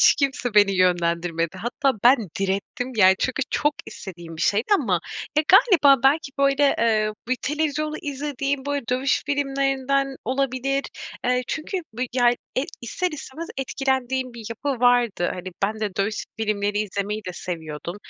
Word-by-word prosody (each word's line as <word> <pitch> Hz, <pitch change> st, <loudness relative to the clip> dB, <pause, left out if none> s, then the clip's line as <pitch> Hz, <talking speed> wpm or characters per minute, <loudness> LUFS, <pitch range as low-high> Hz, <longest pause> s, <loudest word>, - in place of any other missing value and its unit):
Hiç -, -, +7 dB
kimse 270 Hz, -5 st, -1 dB
beni 205 Hz, -1 st, +6 dB
yönlendirmedi. 170 Hz, -1 st, +1 dB
Hatta 255 Hz, +3 st, 0 dB
ben 250 Hz, +3 st, +8 dB, 0.2 s
direttim 200 Hz, +7 st, -2 dB
ya, 190 Hz, -2 st, +7 dB
çünkü 260 Hz, +3 st, 0 dB
çok 295 Hz, 0 st, +1 dB
istediğim 170 Hz, -3 st, -9 dB
bir -, -, -3 dB
şeydi 210 Hz, +3 st, +2 dB
ama, 195 Hz, -, +1 dB, 0.4 s
ya, -, -, +4 dB
galiba 315 Hz, -, +6 dB
belki, 280 Hz, +1 st, +3 dB
böyle, 275 Hz, 0 st, +3 dB
eee, 215 Hz, -2 st, +2 dB, 0.2 s
bir 255 Hz, -, +1 dB
televizyonu 305 Hz, +1 st, -1 dB
izlediğim, 280 Hz, -1 st, -3 dB
böyle, 285 Hz, -3 st, -1 dB
dövüş 260 Hz, +2 st, +1 dB
filmlerinden 275 Hz, -1 st, 0 dB
olabilir. 270 Hz, +2 st, 0 dB, 0.4 s
Eee, 250 Hz, 0 st, +2 dB
çünkü 320 Hz, +5 st, -3 dB, 0.2 s
bi 250 Hz, +3 st, -2 dB
ya 245 Hz, -2 st, +4 dB
e, 245 Hz, +1 st, -4 dB, 0.2 s
ister 355 Hz, +10 st, -2 dB
istemez 305 Hz, +1 st, -7 dB
etkilendiğim 265 Hz, -2 st, -1 dB
bir 230 Hz, -, -9 dB
yapı 255 Hz, +2 st, -3 dB
vardı. 245 Hz, -7 st, +3 dB
Hani, 185 Hz, 0 st, -6 dB, 0.2 s
ben 215 Hz, +2 st, -2 dB
de 205 Hz, -3 st, -2 dB
dövüş 200 Hz, +2 st, 0 dB
s -, -, -4 dB
filmleri 205 Hz, -1 st, 0 dB
izlemeyi 210 Hz, +1 st, -2 dB
de -, -, -4 dB
seviyordum. 170 Hz, 0 st, -6 dB
250 Hz, 155 wpm, -23 LUFS, 205-275 Hz, 0.4 s, ben